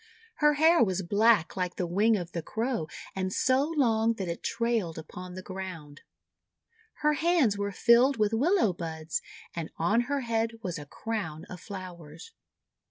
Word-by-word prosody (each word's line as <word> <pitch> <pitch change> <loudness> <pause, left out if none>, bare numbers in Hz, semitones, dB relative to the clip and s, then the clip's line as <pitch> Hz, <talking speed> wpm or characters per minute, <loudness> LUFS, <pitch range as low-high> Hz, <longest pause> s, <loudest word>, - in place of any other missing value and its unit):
Her 295 -1 +4
hair 320 +1 +5
was 190 -2 -1
black 205 0 +3
like 180 -1 -2
the 180 - -1
wing 210 +6 +3
of 175 -2 -6
the 170 - -3
Crow, 225 -1 -2 0.3
and 190 -1 -2
so 265 +8 +2
long 230 -4 +3
that 195 -5 -5
it 170 0 -4
trailed 230 -8 -1
upon 180 +3 -8
the 185 - -7
ground. 185 -7 -8 1.0
Her 300 - +5
hands 315 - +2
were 200 0 -2
filled 240 +7 +4
with 215 0 +1
Willow 275 - +3
buds, 160 -2 -4 0.3
and 165 -2 -4
on 210 +8 +2
her 285 -1 0
head 230 -1 -1
was 175 -4 -3
a 145 - -10
crown 170 -6 -4
of 180 - -7
flowers. 175 -6 -9
200 Hz, 165 wpm, -28 LUFS, 175-235 Hz, 1.0 s, hair